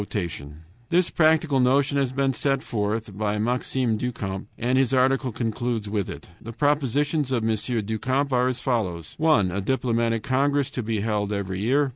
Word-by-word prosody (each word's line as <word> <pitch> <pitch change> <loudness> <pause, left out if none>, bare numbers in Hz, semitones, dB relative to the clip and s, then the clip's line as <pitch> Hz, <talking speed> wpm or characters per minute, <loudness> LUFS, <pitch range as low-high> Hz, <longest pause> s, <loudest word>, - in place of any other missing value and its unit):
This 175 0 +2
practical 155 -3 +3
notion 140 +3 +3
has 135 -2 0
been 135 0 +1
put 135 0 0
forth 105 -1 -2
by 105 0 -1
Maxime 120 +1 0
du 125 +3 -2
Camp, 95 -4 -5
and 125 +2 0
his 135 -1 +3
article 130 0 +2
concludes 115 -1 -2
with 100 -1 -2
it. - - -8
The 115 - -8
propositions 145 +1 +1
of 115 -3 0
M. 110 - +2 0.3
du 110 +1 -3
Camp 135 +3 0
are 125 0 +3
as 125 -1 -2
follows: 95 - -2
1. 155 - +3
A 100 +3 -2
diplomatic 115 -1 0
congress 140 +2 +1
to 125 - -3
be 110 -2 -2
held 105 -1 -1
every 95 -2 -3
year. 135 +7 +2
125 Hz, 175 wpm, -24 LUFS, 110-135 Hz, 0.3 s, practical